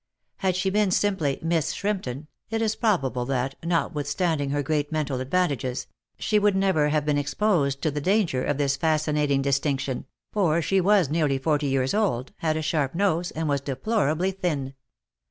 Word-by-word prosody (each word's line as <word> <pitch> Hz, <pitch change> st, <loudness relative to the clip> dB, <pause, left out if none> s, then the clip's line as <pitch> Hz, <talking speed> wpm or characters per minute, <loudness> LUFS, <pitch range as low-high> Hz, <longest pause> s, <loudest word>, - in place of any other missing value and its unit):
Had 185 Hz, -2 st, 0 dB
she 190 Hz, +1 st, 0 dB
been 210 Hz, 0 st, +2 dB
simply 185 Hz, -8 st, +1 dB
Miss 165 Hz, -2 st, 0 dB
Shrimpton, 175 Hz, -10 st, -3 dB, 0.2 s
it 225 Hz, 0 st, -1 dB
is 220 Hz, -1 st, 0 dB
probable 135 Hz, -, 0 dB
that, 135 Hz, 0 st, -1 dB
notwithstanding 160 Hz, -2 st, 0 dB
her 145 Hz, +1 st, 0 dB
great 145 Hz, +1 st, -1 dB
mental 150 Hz, -4 st, -1 dB
advantages, 135 Hz, -4 st, -1 dB, 0.3 s
she 210 Hz, -1 st, +2 dB
would 205 Hz, -1 st, +3 dB
never 190 Hz, -6 st, +2 dB
have 150 Hz, -1 st, +1 dB
been 145 Hz, -1 st, +2 dB
exposed 145 Hz, -2 st, 0 dB
to 155 Hz, -, +1 dB
the 145 Hz, +1 st, -3 dB
danger 185 Hz, -7 st, +1 dB
of 145 Hz, -, -1 dB
this 140 Hz, -1 st, +1 dB
fascinating 150 Hz, -2 st, +1 dB
distinction, 135 Hz, -2 st, -1 dB, 0.3 s
for 170 Hz, -6 st, +2 dB
she 190 Hz, +3 st, +2 dB
was 190 Hz, -6 st, +3 dB
nearly 150 Hz, -4 st, +1 dB
forty 145 Hz, +1 st, 0 dB
years 135 Hz, -1 st, +1 dB
old, 185 Hz, -, 0 dB
had 155 Hz, -1 st, 0 dB
a 155 Hz, -, -2 dB
sharp 150 Hz, -2 st, 0 dB
nose, 175 Hz, -2 st, +1 dB
and 160 Hz, 0 st, -3 dB
was 140 Hz, -2 st, 0 dB
deplorably 170 Hz, -, 0 dB
thin. 155 Hz, -8 st, -2 dB
155 Hz, 170 wpm, -25 LUFS, 140-185 Hz, 0.3 s, would